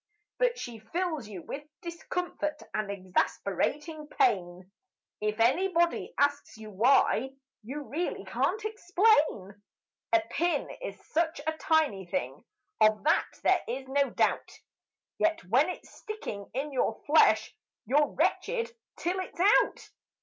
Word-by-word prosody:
But - - +2
she 240 - -7
fills 310 - -3
you 190 -5 -8
with 285 - -6 0.2
discomfort 335 -2 -4
and 215 -2 -2
exasperating 200 - -1
pain 185 - 0 0.5
If 210 +1 -1
anybody 340 +8 +2
asks 285 -4 0
you 215 -1 -10
why, 255 +4 +3 0.3
you 270 +7 -6
really 325 +6 -3
can't 435 0 -1
explain. 350 - +2 0.5
A 340 - +5
pin 345 +1 0
is - - -6
such 325 0 0
a 315 - +1
tiny 305 - +1
thing, 135 -4 -3 0.4
of 215 0 +4
that 305 - +3 0.2
there - - +4
is 270 - -4
no 275 +1 +2
doubt, - - 0 0.7
Yet 325 - +1
when 255 - +3
it's 360 - -7
sticking 430 - -7
in 285 +3 -2
your 225 -4 0
flesh, 220 -8 +4 0.3
you're 290 +6 +3
wretched 470 +7 -1 0.2
till 360 +3 -1
it's 370 - -7
out! 395 +4 +3
290 Hz, 130 wpm, -29 LUFS, 215-345 Hz, 0.7 s, A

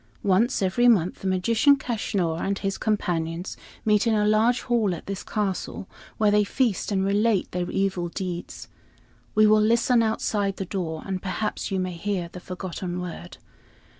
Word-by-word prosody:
Once 205 +4 +2
every 215 +6 +3
month 185 -7 +3
the 195 - -3
magician, 225 +9 +4
Kaschnur, 200 -10 -2
and 195 0 -1
his 195 -1 -3
companions 175 -4 -1 0.3
meet 215 +1 +3
in 225 - +3
a 210 0 +2
large 220 +3 +3
hall 225 -7 +1
at - - -10
this 195 0 -4
castle, 195 -2 -3 0.3
where 210 -1 +3
they 210 0 +4
feast 220 -1 0
and 190 -1 +1
relate 205 0 +1
their 180 0 -2
evil 190 -3 -1
deeds. 180 -1 -5 0.7
We 215 0 +6
will 215 0 +5
listen 230 +2 +3
outside 210 -3 0
the 195 - -3
door, 170 -4 -4
and 190 -2 -3
perhaps 200 +3 -3
you 195 -2 -1
may 185 -1 -2
hear 175 0 -3
the 180 - -8
forgotten 180 -1 -5
word. 170 - -7
195 Hz, 165 wpm, -25 LUFS, 180-215 Hz, 0.7 s, We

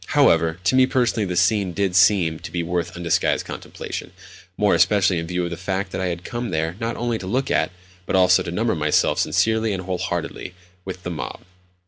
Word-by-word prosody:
However, 80 0 +4
to 95 - +2
me 130 0 +5
personally 120 -5 +1
the 90 - -3
scene 95 +1 +2
did 95 +1 -1
seem 90 -4 +4
to - - -9
be 85 -1 -2
worth 85 0 -2
undisguised 85 -2 0
contemplation—more 95 +3 -5
especially 95 -4 +3
in 80 - -5
view 90 +1 -1
of 85 - -3
the 85 - -4
fact 95 +1 -3
that - - -3
I 95 - 0
had 85 0 -4
come 120 +3 -4
there 80 0 -1
not 115 +1 -3
only 120 -2 -1
to 95 - -7
look 130 +6 -1
at, - - +2 0.4
but - - 0
also 90 -1 +5
to - - -5
number 110 +6 0
myself 75 -2 +1
sincerely 110 -1 +1
and 95 -1 -4
wholeheartedly 90 0 -4 0.3
with, 95 -1 -7
the 90 - -4
mob. 80 - -6
90 Hz, 200 wpm, -22 LUFS, 85-105 Hz, 0.4 s, me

